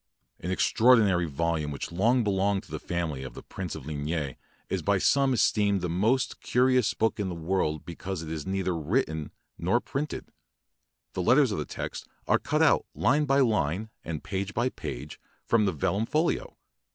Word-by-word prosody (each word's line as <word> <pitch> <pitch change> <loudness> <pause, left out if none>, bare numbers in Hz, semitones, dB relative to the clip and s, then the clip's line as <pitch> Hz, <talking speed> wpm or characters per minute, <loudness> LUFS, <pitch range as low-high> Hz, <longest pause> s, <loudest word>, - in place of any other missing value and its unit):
An 90 - -5
extraordinary 100 -3 +4
volume 80 +1 -1
which 70 +3 -5
long 115 +8 +3
belonged 100 -1 +1
to - - -17
the - - -4
family 85 -6 -3
of 65 - -8
the - - -9
Prince 90 -4 -6
de - - -5
LIgne 75 0 -3 0.3
is - - -2
by - - +2
some 140 -1 +3
esteemed 105 -5 +2
the 90 - -2
moat 110 +9 +2
carious 125 -2 +2
book 110 -1 0
in 100 -2 -1
the 90 - -4
world 80 -3 -1
because 85 +1 -5
it 80 - -6
is 80 -2 -3
neither 95 -2 -1
written 80 - -1 0.3
nor 95 +8 +2
printed. 145 +4 -4 0.8
The 90 - -2
let 105 - +5
ters 140 -5 +4
of 100 - -2
the 75 - -2
text - - -6 0.2
are - - +4
cut - - +1
out - - +4
line 145 +4 +3
by 140 0 +3
line 105 - +1
and 80 -3 -5
page 100 +1 -3
by 120 +2 +2
page 70 - -7 0.3
from 115 -2 +3
the 95 - +2
vellum 100 +8 -1
folio. 170 - 0
95 Hz, 185 wpm, -28 LUFS, 80-115 Hz, 0.8 s, let